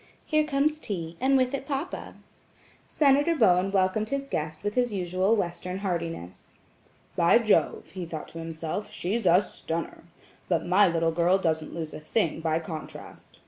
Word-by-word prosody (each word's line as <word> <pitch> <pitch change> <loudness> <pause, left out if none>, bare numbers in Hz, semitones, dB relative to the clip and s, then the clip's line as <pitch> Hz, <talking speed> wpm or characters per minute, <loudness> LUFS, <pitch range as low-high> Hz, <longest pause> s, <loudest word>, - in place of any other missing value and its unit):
"Here 305 -1 +2
comes 300 +1 +1
tea, 170 - -5
and 270 +1 +4
with 255 0 +1
it 275 0 -4
papa." 290 +5 -4 0.7
Senator 290 +3 +3
Bowen 190 - +4
welcomed 195 +2 +1
his 275 0 -2
guest 155 - -4
with 205 0 -1
his 245 -1 +1
usual 185 +2 +1
Western 180 -2 -3
heartiness. 170 - -5 0.6
"By 170 +5 +5
Jove," 220 -3 +1
he 185 -3 -6
thought 160 -2 -6
to 165 - -9
himself, 165 +4 -5
"she's 200 +3 -2
a 175 +3 +6
stunner! 165 -4 -5 0.4
But 170 -3 +1
my 190 +3 +5
little 165 -1 +1
girl 175 +3 +3
doesn't 160 -4 -1
lose 160 -2 -5
a - - -6
thing 160 +1 -1
by 160 -1 0
contrast. 160 -1 -9
185 Hz, 160 wpm, -27 LUFS, 165-235 Hz, 0.7 s, a